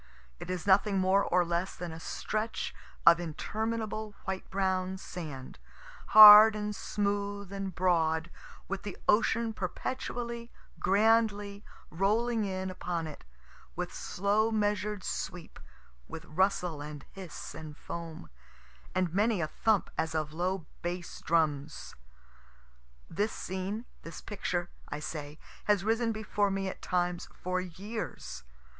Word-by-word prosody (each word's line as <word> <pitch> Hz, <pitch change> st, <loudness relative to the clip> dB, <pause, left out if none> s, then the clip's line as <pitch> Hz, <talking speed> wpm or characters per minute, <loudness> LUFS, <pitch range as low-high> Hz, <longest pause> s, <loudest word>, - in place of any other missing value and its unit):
It -, -, -8 dB
is 180 Hz, -3 st, -3 dB
nothing 200 Hz, +1 st, +4 dB
more 190 Hz, +1 st, +3 dB
or 180 Hz, 0 st, +2 dB
less 175 Hz, +2 st, -1 dB
than 175 Hz, -2 st, -6 dB
a 160 Hz, -, -8 dB
stretch 215 Hz, +6 st, -3 dB, 0.3 s
of 170 Hz, 0 st, +8 dB
interminable 215 Hz, +5 st, -3 dB
white 190 Hz, 0 st, -4 dB
brown 190 Hz, -1 st, 0 dB
sand, 155 Hz, -9 st, -8 dB, 0.5 s
hard 215 Hz, 0 st, +11 dB
and 210 Hz, 0 st, -3 dB
smooth 200 Hz, -1 st, -2 dB
and 195 Hz, -2 st, -4 dB
broad, 165 Hz, -2 st, +1 dB, 0.4 s
with 195 Hz, 0 st, -3 dB
the 205 Hz, -2 st, -6 dB
ocean 225 Hz, +1 st, +3 dB
perpetually, 235 Hz, +4 st, -4 dB, 0.3 s
grandly, 205 Hz, 0 st, +2 dB, 0.3 s
rolling 215 Hz, +5 st, +1 dB
in 190 Hz, -1 st, -3 dB
upon 175 Hz, -2 st, -3 dB
it, 155 Hz, -2 st, -9 dB, 0.5 s
with -, -, -4 dB
slow 205 Hz, +4 st, +1 dB
measured 210 Hz, -2 st, 0 dB
sweep, 175 Hz, -2 st, -5 dB, 0.5 s
with 160 Hz, -, -8 dB
rustle 180 Hz, -2 st, 0 dB
and 150 Hz, -1 st, -8 dB
hiss 185 Hz, -7 st, -8 dB
and 155 Hz, -1 st, -9 dB
foam, 165 Hz, -2 st, -7 dB, 0.6 s
and 185 Hz, -3 st, +1 dB
many 210 Hz, +1 st, +2 dB
a 165 Hz, -, +1 dB
thump 210 Hz, +5 st, +1 dB
as 160 Hz, 0 st, 0 dB
of 155 Hz, -1 st, -2 dB
low 180 Hz, +1 st, -1 dB, 0.2 s
bass 175 Hz, 0 st, -5 dB
drums. 150 Hz, -4 st, 0 dB, 1.1 s
This 205 Hz, +6 st, -1 dB
scene, 190 Hz, +5 st, -4 dB, 0.2 s
this 165 Hz, -1 st, -8 dB
picture, 175 Hz, -4 st, -3 dB, 0.2 s
I 150 Hz, -, -4 dB
say, 150 Hz, -1 st, -6 dB, 0.3 s
has 205 Hz, -3 st, +3 dB
risen 225 Hz, +2 st, +1 dB
before 215 Hz, -2 st, 0 dB
me 195 Hz, 0 st, -1 dB
at 190 Hz, -, -6 dB
times 175 Hz, -1 st, -1 dB
for 185 Hz, 0 st, -2 dB
years. 195 Hz, -, -6 dB
190 Hz, 125 wpm, -30 LUFS, 170-210 Hz, 1.1 s, hard